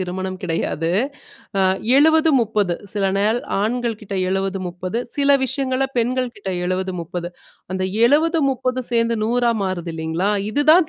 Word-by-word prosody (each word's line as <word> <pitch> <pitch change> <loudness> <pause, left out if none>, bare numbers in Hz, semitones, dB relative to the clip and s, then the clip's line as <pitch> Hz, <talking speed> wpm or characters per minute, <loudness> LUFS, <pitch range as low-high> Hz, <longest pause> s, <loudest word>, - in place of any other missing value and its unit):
திருமணம் 185 +1 -4
கிடையாது. 165 -1 -1 0.7
ஆ - - +3 0.4
70: 315 +2 +5
30 210 -6 0 0.2
சில 205 -2 -1
நாள் 215 +4 +2 0.2
ஆண்கள் 235 0 -1
கிட்ட 200 -1 -6 0.2
70: 195 0 -1
30 180 +5 -4 0.2
சில 285 0 +3
விஷயங்களை 265 0 0
பெண்கள்கிட்ட 240 -4 -1 0.2
70: 185 0 -1
30 175 +1 -5 0.4
அந்த 185 - -2 0.2
70: 320 +4 +3
30 255 0 -1
சேர்ந்து 230 0 +2
100ஆ 240 +1 +2
மாறுது 175 -3 -3
இல்லைங்களா? 160 +5 -1 0.2
இதுதான் 310 +6 +5
220 Hz, 130 wpm, -21 LUFS, 185-255 Hz, 0.7 s, 70